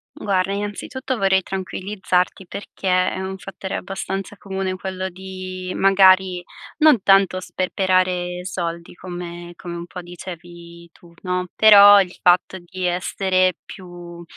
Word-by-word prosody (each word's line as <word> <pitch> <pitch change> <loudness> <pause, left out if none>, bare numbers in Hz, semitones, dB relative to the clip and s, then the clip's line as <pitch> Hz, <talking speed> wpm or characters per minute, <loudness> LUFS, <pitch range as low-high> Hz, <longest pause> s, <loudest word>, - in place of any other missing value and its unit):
Guarda, 195 -1 -1
innanzitutto 205 +6 -4
vorrei 190 -2 +2
tranquillizzarti, 190 -1 -2
perché 200 +1 -9 0.3
è - - -5
un 190 0 -5
fattore 195 0 -6
abbastanza 195 +1 -5
comune, 190 -1 -4
quello 190 0 -4
di 185 0 -7
magari 190 -2 +4 0.3
non 300 -10 +5
tanto 195 -1 +4
sperperare 180 -1 -1
soldi, 170 -3 -5
come 175 -1 -8
come 175 -2 -8
un 170 - -7
po' 180 +1 -8
dicevi 170 -1 -11
tu, 170 -1 -20
no, 180 -1 -2
però 205 -1 +9
il 180 -1 -8
fatto 180 +1 +3
di 185 +1 -8
essere 185 +1 +1
più 175 -2 -11
185 Hz, 125 wpm, -21 LUFS, 175-195 Hz, 0.3 s, però